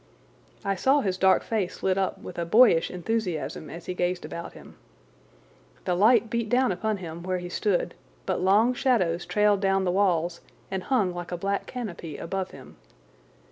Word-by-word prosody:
I 195 - +1
saw 270 +9 +3
his 190 -6 -1
dark 190 0 +4
face 210 -6 -3
lit 190 -1 +2
up 190 0 -1
with 175 - -8
a - - 0
boyish 205 -2 +5
enthusiasm 180 -4 -3
as 170 +1 -9
he 180 - -3
gazed 180 0 -1
about 170 - -7
him. - - -14 1.1
The - - +1
light 225 +6 +4
beat 235 0 -2
upon 220 -4 +1
him 170 -2 -7
where 185 +1 -2
he 175 0 -6
stood, 195 0 0 0.3
but - - -1
long 210 +6 +4
shadows 200 -10 +1
trailed 210 -1 +3
down 195 -1 +2
the 180 - +1
walls 175 -3 +1 0.3
and 190 -1 -2
hung 210 -9 +1
like 175 0 -6
a 175 - -2
black 200 +3 -2
canopy 175 - -6
above 190 +2 -3
him. - - -13
190 Hz, 175 wpm, -26 LUFS, 175-215 Hz, 1.1 s, boyish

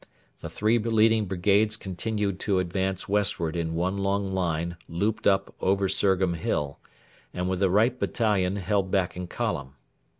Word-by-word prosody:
The - - -7
three 110 +3 +1
leading 110 -1 +3
brigades 100 +4 +2
continued 100 0 -3
to 100 -3 0
advance 95 +1 -1
westward 95 -5 +1
in 80 -1 -2
one 90 +4 -1
long 100 0 -1
line 85 -2 -1
looped 100 +6 -1
up 95 -1 +2
over 95 +1 +2
Surgham 95 -1 +2
Hill, 75 -3 -2 0.6
and 90 0 -2
with 95 -1 -1
the 95 -1 +3
right 115 +6 +2
battalion 100 -5 +1
held 100 0 0
back 95 -2 0
in 90 0 -5
column. 70 -4 -3
95 Hz, 155 wpm, -26 LUFS, 90-105 Hz, 0.6 s, leading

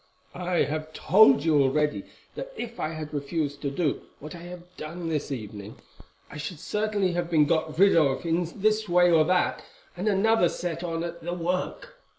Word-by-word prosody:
I 180 -1 0
have 155 +1 -4
told 160 -6 +5
you 155 -3 +4
already 150 +2 +1 0.3
that - - -7
if 235 - -6
I 155 - -1
had 155 -1 -7
refused 145 0 -3
to 140 - -1
do 145 +1 -1 0.2
what 150 +2 -9
I 175 - -9
have 175 0 -9
done 165 +2 -6
this 150 -2 -2
evening 105 -4 -7 0.5
I - - -10
should 150 +2 -6
certainly 210 -2 -1
have 175 -1 -2
been 155 -3 +4
got 155 +1 0
rid 195 +2 +6
of 145 -1 +2
in 165 +1 0
this 215 -1 +2
way 175 0 +5
or 160 -2 +6
that, 180 +2 +1 0.3
and 185 +4 -3
another 210 -2 +3
set 175 -1 -4
on 165 -1 -2
at 170 0 -6
the 175 +1 -3
work. 185 - -3
170 Hz, 185 wpm, -26 LUFS, 150-180 Hz, 0.5 s, rid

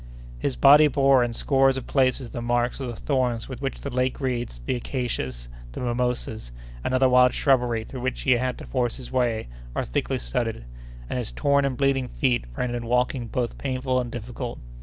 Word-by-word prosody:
His 130 - -1
body 145 +2 +7
bore 135 -2 +4
in 120 - -1
scores 135 +2 +3
of 130 - -5
places 130 -2 +1
the 120 - -5
marks 120 +1 0
of 135 - -3
the 120 - -5
thorns 125 -3 -1
with 130 -1 -7
which 135 -1 -3
the 140 - -5
lake 125 +1 0
reeds, 120 - -2
the - - 0
acacias, 115 - -3 0.3
the - - -6
mimosas, 120 - -2 0.3
and - - -1
other 130 0 +5
wild 125 0 +5
shrubbery 125 -5 +2
through 125 +2 -8
which 130 +1 -2
he 135 - +2
had 125 +1 +1
to - - -9
force 125 -3 -1
his 130 - -9
way, 120 -4 0 0.3
are - - -1
thickly - - -1
studded; - - -3 0.4
and 125 - -2
his 120 - -4
torn 140 -1 +2
and 130 -2 -1
bleeding 135 -2 +1
feet 125 - 0
rendered 120 -1 -2
walking 125 +1 0
both 120 +1 -3
painful 130 -1 0
and 120 -1 -6
difficult. 120 +1 -5
125 Hz, 195 wpm, -25 LUFS, 120-130 Hz, 0.4 s, body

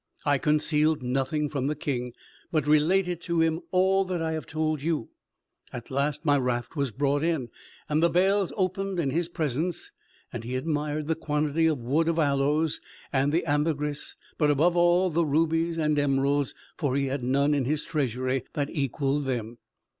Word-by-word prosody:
I 145 -2 +3
concealed 150 -1 +2
nothing 135 +4 0
from 140 -2 -2
the 150 - -1
king; 125 -4 -3 0.4
but 155 -4 +1
related 175 +4 +2
to 170 -1 -1
him 165 0 +2
all 190 +1 +3
that 185 -2 -2
I 160 0 -1
have 160 -1 -4
told 155 -1 -1
you. 155 -6 -1 0.6
At 120 0 -8
last 140 +3 -1
my 145 -2 +4
raft 125 +2 -2
was 140 -3 0
brought 140 +4 0
in, 160 -8 0 0.4
and 150 +1 +1
the 170 - +4
bales 190 +2 +2
opened 190 0 -1
in 140 -5 0
his 170 +3 0
presence: 160 0 -3 0.5
he 120 +3 -5
admired 150 +1 -2
the 160 - +1
quantity 155 0 0
of 155 -2 +1
wood 150 +7 +1
of 165 - 0
aloes 150 +1 +1 0.3
and 140 +3 +2
ambergris; 150 0 -1 0.2
but 150 -2 +3
above 160 +5 +3
all, 175 +1 +4
the 170 +2 +2
rubies 165 +2 +1
and 150 -2 +1
emeralds, 140 0 +1 0.2
for 140 -6 0
he 140 0 +1
had 135 0 -2
none 140 +4 +2
in 140 -3 +1
his 150 +3 0
treasury 130 -4 -1
that 145 -2 -2
equalled 140 -1 -1
them. 120 -3 -3
150 Hz, 170 wpm, -27 LUFS, 140-165 Hz, 0.6 s, my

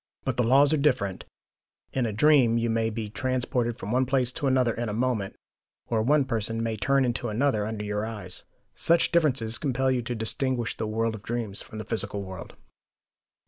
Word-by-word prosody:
But 130 -3 -1
the 125 - +2
laws 140 +5 +5
are - - +3
different: 125 -10 0 0.7
in 130 -3 0
a - - -2
dream 120 0 +4
you 115 0 0
may 115 0 +1
be 110 -1 -4
transported 125 0 -1
from 100 - -6
one 130 +1 +2
place 130 -2 +2
to 145 +1 -3
another 130 -3 +2
in 120 0 -3
a - - -3
moment, 115 -4 -1 0.5
or 115 -2 +1
one 140 +4 +3
person 115 -2 -2
may 115 -1 -1
turn 135 +5 +2
into 120 -1 -2
another 110 -2 +1
under 110 -1 -4
your 105 0 -2
eyes. 105 -5 -6 0.3
Such 170 0 +2
differences 130 -9 +2
compel 130 -2 0
you 125 -1 +1
to 120 +1 -4
distinguish 120 +2 -1
the 110 - -3
world 115 +1 -1
of 110 - -8
dreams 110 -3 -3
from 110 - -10
the 110 - -6
physical 100 -2 -1
world. 95 -3 -9
115 Hz, 195 wpm, -26 LUFS, 110-130 Hz, 0.7 s, laws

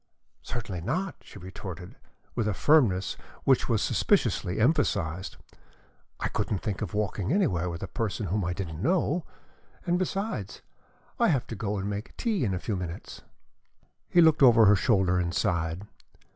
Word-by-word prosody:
"Certainly 100 -7 -5
not," 180 - -2
she - - -13
retorted, 90 -1 -8 0.4
with 115 -3 -1
a 105 - 0
firmness 115 -12 +3 0.3
which - - +3
was - - +2
suspiciously 90 +4 +1
emphasized. 95 - 0 0.8
"I - - 0
couldn't 100 - -2
think 100 -4 -3
of 105 -3 -4
walking 105 0 -1
anywhere 110 - +1
with 85 +1 -6
a - - -3
person 110 +2 -3
whom 100 +3 -1
I 90 +1 -1
didn't 85 -4 -5
know! 170 - +1 0.6
And 175 0 +1
besides, 185 - -3 0.6
I - - +4
have 140 -7 +1
to 115 - -6
go 105 0 -2
and 95 +1 -3
make 105 +2 -5
tea 215 - 0
in 95 -5 0
a - - -3
few 105 - -3
minutes." 90 -2 -6 0.9
He 175 - +5
looked 160 -2 +5
over 115 -4 +7
her 105 +1 +7
shoulder 95 -4 +2
and 85 -1 -2
sighed. 85 +2 -1
100 Hz, 160 wpm, -28 LUFS, 90-130 Hz, 0.9 s, over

